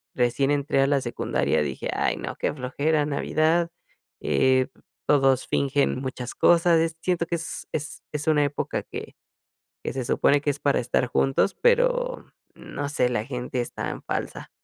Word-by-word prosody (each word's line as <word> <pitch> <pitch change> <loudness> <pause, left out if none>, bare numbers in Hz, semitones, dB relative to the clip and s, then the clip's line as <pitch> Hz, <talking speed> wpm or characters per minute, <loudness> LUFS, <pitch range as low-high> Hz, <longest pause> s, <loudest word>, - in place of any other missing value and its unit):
recién 125 +2 +1
entré 140 -1 +1
a 135 - +3
la 140 -1 +3
secundaria 120 -9 0
dije: 70 -3 -3
"Ay - - 0
no, - - -5
qué - - 0
flojera 145 +3 0
Navidad, 155 +3 +1 0.5
eh, 130 -1 +3 0.4
todos 135 -3 +3
fingen 140 -1 +1
muchas 130 -2 -5
cosas", 170 -1 +5
es 160 0 0
siento 175 -2 0
que 170 - -1
es 165 -1 -6
es 150 -1 -5
es 150 0 -3
una 150 -2 +4
época 145 +1 -2
que - - -8 0.7
que - - -2
se 130 -2 -3
supone 140 +4 +3
que 145 - 0
es 145 +1 -4
para 140 - +2
estar 125 +1 0
juntos, 135 +9 +1
pero - - +2 0.3
no 145 - -6
sé, 135 -4 +1
la 110 -3 -1
gente 125 -1 -3
es 120 - -4
tan - - -5
falsa. - - -4
145 Hz, 170 wpm, -25 LUFS, 130-160 Hz, 0.7 s, cosas